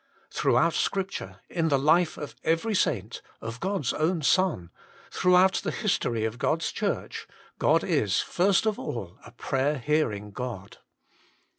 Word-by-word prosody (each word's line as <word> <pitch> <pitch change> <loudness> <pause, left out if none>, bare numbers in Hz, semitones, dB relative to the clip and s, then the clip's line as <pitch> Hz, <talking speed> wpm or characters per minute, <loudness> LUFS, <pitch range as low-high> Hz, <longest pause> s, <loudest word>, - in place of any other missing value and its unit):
Throughout - - +2
Scripture, 195 0 -2
in 165 -2 -1
the 140 - +3
life 160 +5 +3
of 145 - -7
every 165 +8 +1
saint, 115 - -1 0.2
of 115 +1 -7
God 195 0 -1
s - - +1
own 160 +1 0
Son, 155 - +2 0.4
throughout 180 +1 +4
the - - -1
history 120 - -1
of 110 +2 -4
God 165 +1 0
s - - -1
Church, - - -3 0.3
God - - +3
is, 100 -1 +1
first 190 +3 +2
of 215 -1 0
all, 100 -4 -6
a - - -13
prayer 135 +4 -1
hearing 120 -8 -1
God. 110 -4 -7
150 Hz, 150 wpm, -27 LUFS, 115-180 Hz, 0.4 s, throughout